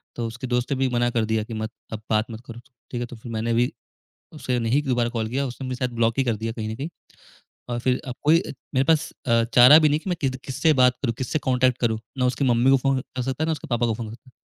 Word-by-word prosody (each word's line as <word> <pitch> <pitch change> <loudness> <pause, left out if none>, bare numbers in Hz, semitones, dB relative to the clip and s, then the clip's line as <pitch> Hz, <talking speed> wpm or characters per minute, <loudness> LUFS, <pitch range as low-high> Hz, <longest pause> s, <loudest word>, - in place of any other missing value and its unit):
तो 120 - -3
उसके 120 +3 -6
दोस्त 125 +1 -1
ने 140 - +1
भी 135 0 +2
मना 120 0 +1
कर 115 -2 0
दिया 110 0 0
कि 115 - -8
मत 110 0 -4 0.2
अब 110 - -5
बात 110 +1 +1
मत 110 - -8
करो, 115 0 -9 0.3
ठीक 120 - -3
है? - - -1
तो 120 - -10
फिर 115 +1 -10
मैंने 115 +1 -1
भी 120 +2 +2 0.6
उसे 130 -5 -2
नहीं 120 +5 +1
दोबारा 120 -4 +1
कॉल 115 -2 -2
किया, 135 +4 -1
उसने 130 +1 -6
मुझे 130 -1 -4
शायद 125 -1 -1
ब्लॉक 115 +1 +1
ही - - +4
कर 115 -3 +1
दिया 110 +2 -4
कहीं 110 -1 -5
न 110 - -4
कहीं। 140 +7 -5 0.8
और 120 - -1
फिर 125 +1 0
अब 125 - -4
कोई 165 +4 +4 0.3
मेरे 130 - +3
पास 160 +1 +2 0.2
अ, 115 -1 +3
चारा 125 +5 +9
भी 155 -1 +4
नहीं 150 +1 +2
कि 190 - -5
मैं 175 - 0
कि 135 - +1
किससे 140 +4 +2
बात 125 -1 +5
करूँ, 120 -4 0
किससे 130 +4 -1
कॉन्टैक्ट 130 -2 +1
करूँ, 110 -2 0 0.2
ना 125 - +2
उसकी 125 +2 0
मम्मी 120 0 +3
को 135 - +6
फ़ोन 135 0 +1
कर 130 0 -6
सकता 135 +4 -2
है, - - -1
ना 160 - +1
उसके 155 - -6
पापा 120 -1 +1
को 115 - 0
फ़ोन 110 -1 -6
कर 130 - -18
125 Hz, 285 wpm, -24 LUFS, 115-135 Hz, 0.8 s, चारा